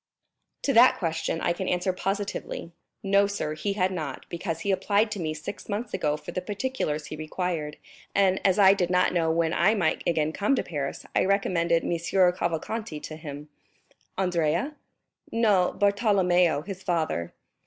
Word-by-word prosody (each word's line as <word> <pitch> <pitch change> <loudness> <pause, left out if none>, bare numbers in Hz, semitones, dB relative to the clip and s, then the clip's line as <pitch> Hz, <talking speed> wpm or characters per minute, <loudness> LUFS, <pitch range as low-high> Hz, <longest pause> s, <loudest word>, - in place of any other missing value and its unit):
"To 275 - +1
that 245 +2 +7
question 165 -1 -2
I 170 - +1
can 185 +2 -4
answer 180 +1 0
positively; 195 -2 -3 0.3
no, 200 0 +4
sir, 200 -7 -3
he 200 +6 -2
had 190 -2 +1
not, 155 -7 -5
because 170 -1 -4
he 200 - 0
applied 205 +3 +1
to 205 - -3
me 155 -2 -2
six 155 +8 -8
months 215 +4 -3
ago 150 0 0
for - - -9
the 185 - -3
particulars 200 - -3
he - - -6
required, 155 -1 -3 0.4
and 190 -1 +3
as 190 0 +3
I 195 -1 +7
did 180 -3 0
not 180 0 +2
know 165 -2 +1
when 165 0 +1
I 210 +6 +3
might 175 -7 +1
again 155 -2 +1
come 210 - +1
to - - -1
Paris, 140 -4 -4
I - - +4
recommended 175 -4 +1
M. - - -2 0.4
Cavalcanti 170 +1 -3
to 155 - -7
him." 150 -1 -8 0.7
"Andrea?" 180 - 0 0.6
"No, 210 -6 +3
Bartolomeo, 185 -6 +3
his 195 0 -7
father." 160 - -1
180 Hz, 165 wpm, -26 LUFS, 160-200 Hz, 0.7 s, that